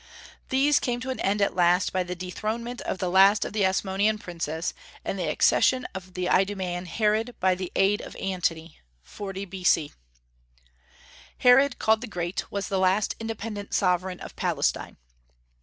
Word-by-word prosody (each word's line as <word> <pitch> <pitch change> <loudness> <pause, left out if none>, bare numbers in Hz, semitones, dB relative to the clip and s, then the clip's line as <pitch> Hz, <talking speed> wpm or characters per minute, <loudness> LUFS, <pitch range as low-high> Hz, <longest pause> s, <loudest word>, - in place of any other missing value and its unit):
These 275 +2 +3
came 245 -1 -2
to 260 +1 -3
an 260 - -5
end 200 +1 +1
at - - 0
last 180 +1 +3
by 185 - +1
the 180 0 -4
dethronement 220 +7 -4
of - - -3
the 185 - -2
last 195 +3 +5
of - - -6
the 210 -2 +1
Asmonean 195 +3 +1
princes, 170 -3 -4 0.3
and 195 - -3
the 170 -4 -1
accession 255 +10 +3
of 185 -1 -9
the 180 -1 -2
Idumaean 185 -2 0
Herod 220 +5 0
by 185 0 +3
the 180 -1 -5
aid 195 +2 +3
of - - -10
Antony 170 -4 -3 0.2
(40 195 - -6
B.C.). 180 -5 +1 1.4
Herod, 250 +1 +5
called 220 0 +2
the 245 - -5
Great, 175 -2 -4
was 200 -1 -3
the 195 - -1
last 190 +3 +2
independent 220 -2 -5
sovereign 180 -1 +1
of - - -9
Palestine. - - -1
195 Hz, 160 wpm, -26 LUFS, 180-215 Hz, 1.4 s, last